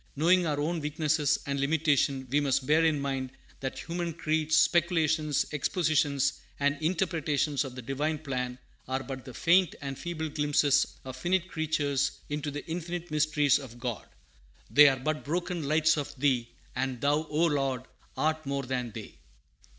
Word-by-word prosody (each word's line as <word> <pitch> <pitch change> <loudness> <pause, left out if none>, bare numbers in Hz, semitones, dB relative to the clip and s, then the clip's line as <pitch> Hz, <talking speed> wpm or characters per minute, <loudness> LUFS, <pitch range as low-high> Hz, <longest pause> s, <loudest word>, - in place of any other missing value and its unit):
Knowing 175 +4 +4
our 145 -2 -1
own 165 +3 -1
weaknesses 150 -1 +1
and 140 0 -2
limitations, 140 -2 +1
we 145 - +4
must 135 -2 +1
bear 155 +4 +4
in 160 -3 +2
mind 135 -2 -2 0.3
that 130 -1 -4
human 170 0 -3
creeds, 155 -1 +1
speculations, 160 -4 +2
expositions, 150 -2 +1 0.2
and 145 0 +2
interpretations 155 -5 0
of 130 -3 -8
the 130 - -7
Divine 145 +5 -1
plan 125 -4 -3 0.3
are 130 +1 -2
but 130 -2 -7
the 130 - -9
faint 180 0 +3
and 135 -1 -6
feeble 165 -2 -3
glimpses 145 -1 +2 0.2
of 130 -1 -6
finite 175 +6 0
creatures 150 -4 0 0.2
into 150 0 -2
the 145 0 -6
infinite 175 0 -5
mysteries 150 -2 +3
of 125 -4 -10
God. 120 -3 -4 0.6
"They 145 +1 +9
are 135 - 0
but 155 +4 -2
broken 175 0 -2
lights 155 +1 +3
of 145 - -4
Thee, 125 -4 +1 0.3
And 130 -1 -2
Thou, 145 +4 +1
O 155 +3 +2
Lord, 135 -5 0 0.3
art 155 0 0
more 140 0 -1
than 125 -2 -2
they." - - -9
150 Hz, 160 wpm, -29 LUFS, 135-160 Hz, 0.6 s, They